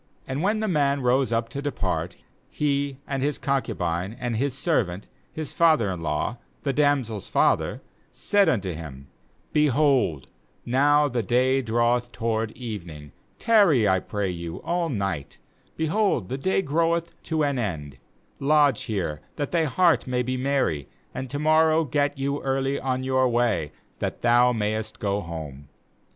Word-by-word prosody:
9And 130 Hz, +3 st, -3 dB
when 210 Hz, +4 st, +1 dB
the 220 Hz, -, 0 dB
man 140 Hz, -5 st, +1 dB
rose 125 Hz, +1 st, +2 dB
up 115 Hz, 0 st, 0 dB
to 140 Hz, +4 st, -5 dB
depart, 145 Hz, -3 st, -2 dB, 0.3 s
he, 140 Hz, -2 st, -1 dB
and 135 Hz, -2 st, -3 dB
his^ 145 Hz, +2 st, -1 dB
concubine, 105 Hz, -, -2 dB
and 120 Hz, -2 st, -2 dB
his 135 Hz, +3 st, -1 dB
servant, 105 Hz, -, 0 dB, 0.2 s
his 155 Hz, -3 st, -6 dB
father 155 Hz, -, +3 dB
in 90 Hz, -3 st, -5 dB
law, 80 Hz, +9 st, -2 dB, 0.2 s
the 140 Hz, -, 0 dB
damsel's 135 Hz, -8 st, +1 dB
father, -, -, +1 dB, 0.3 s
said 200 Hz, -4 st, +2 dB
unto 100 Hz, -, 0 dB
him: 70 Hz, -4 st, -9 dB, 0.4 s
'Behold, 140 Hz, -, +2 dB, 0.4 s
now 145 Hz, +4 st, +4 dB
the 125 Hz, -3 st, -1 dB
day 130 Hz, +5 st, +2 dB
draweth 120 Hz, +1 st, +1 dB
toward 115 Hz, -1 st, -1 dB
evening; 85 Hz, -, -7 dB, 0.3 s
tar 215 Hz, -4 st, +5 dB
ry, 120 Hz, -8 st, +3 dB
I 95 Hz, -1 st, +3 dB
pray 100 Hz, 0 st, -3 dB
you, 85 Hz, -1 st, -6 dB
all 170 Hz, -1 st, -1 dB
night; 95 Hz, -, -3 dB, 0.4 s
behold, 160 Hz, -, +1 dB
the 130 Hz, -, -2 dB
day 190 Hz, +5 st, +1 dB
groweth 170 Hz, +2 st, 0 dB
to 160 Hz, -2 st, 0 dB
an 140 Hz, -3 st, 0 dB
end; 75 Hz, -, -4 dB, 0.4 s
lodge 145 Hz, -3 st, +3 dB
here, 85 Hz, -8 st, -3 dB
that 145 Hz, -2 st, -3 dB
thy 165 Hz, -2 st, +2 dB
heart 170 Hz, +1 st, +2 dB
may 125 Hz, -1 st, 0 dB
be 130 Hz, +1 st, -2 dB
merry; 130 Hz, -, 0 dB, 0.2 s
and 130 Hz, 0 st, -5 dB
to 145 Hz, -, -4 dB
morrow 155 Hz, +1 st, +4 dB
get 145 Hz, +1 st, 0 dB
you 140 Hz, +1 st, -2 dB
early 135 Hz, +1 st, 0 dB
on 130 Hz, -1 st, -2 dB
your 130 Hz, -1 st, +2 dB
way, 115 Hz, -11 st, +1 dB, 0.3 s
that -, -, -4 dB
thou 120 Hz, +1 st, +5 dB
mayest 110 Hz, -1 st, -2 dB
go 100 Hz, 0 st, -1 dB
home.' 75 Hz, -5 st, -8 dB
130 Hz, 155 wpm, -25 LUFS, 105-145 Hz, 0.4 s, tar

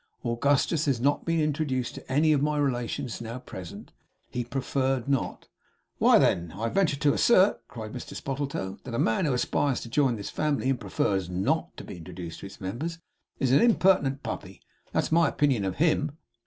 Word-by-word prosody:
Augustus 140 Hz, +6 st, +2 dB
has 135 Hz, -5 st, +1 dB
not 140 Hz, +4 st, +1 dB
been 165 Hz, 0 st, +1 dB
introduced 145 Hz, -5 st, -1 dB
to -, -, -10 dB
any 155 Hz, +3 st, +4 dB
of 140 Hz, -, +2 dB
my 150 Hz, +1 st, +1 dB
relations 125 Hz, -2 st, -2 dB
now 115 Hz, +1 st, -5 dB
present. 95 Hz, -8 st, -9 dB, 0.4 s
He 125 Hz, -, -2 dB
preferred 130 Hz, 0 st, -1 dB
not.' 140 Hz, -2 st, -1 dB, 0.5 s
'Why, -, -, +6 dB
then, 85 Hz, -1 st, +2 dB
I 115 Hz, +2 st, -1 dB
venture 180 Hz, -4 st, +2 dB
to 145 Hz, 0 st, +2 dB
assert,' 200 Hz, -4 st, +4 dB
cried 110 Hz, -5 st, -8 dB
Mr 125 Hz, -, -7 dB
Spottletoe, 135 Hz, -9 st, -4 dB
'that -, -, -8 dB
the 115 Hz, -, -3 dB
man 115 Hz, +11 st, +2 dB
who 145 Hz, -, +1 dB
aspires 135 Hz, +1 st, +1 dB
to 115 Hz, -, -8 dB
join 130 Hz, -1 st, +2 dB
this 100 Hz, -2 st, -6 dB
family, 145 Hz, -3 st, 0 dB
and 130 Hz, -, -1 dB
"prefers 95 Hz, -3 st, -1 dB
not" 90 Hz, +2 st, -1 dB
to -, -, -7 dB
be -, -, -8 dB
introduced 85 Hz, 0 st, -8 dB
to -, -, -7 dB
its 100 Hz, -, -13 dB
members, 120 Hz, -, -4 dB, 0.4 s
is 130 Hz, -3 st, +1 dB
an 135 Hz, -, +6 dB
impertinent 185 Hz, -, +3 dB
Puppy. 95 Hz, -1 st, -6 dB, 0.3 s
That -, -, +1 dB
is -, -, -5 dB
my 165 Hz, -2 st, +4 dB
opinion 135 Hz, -9 st, +1 dB
of 95 Hz, -, -2 dB
HIM! 155 Hz, -1 st, +1 dB
135 Hz, 190 wpm, -27 LUFS, 115-150 Hz, 0.5 s, Why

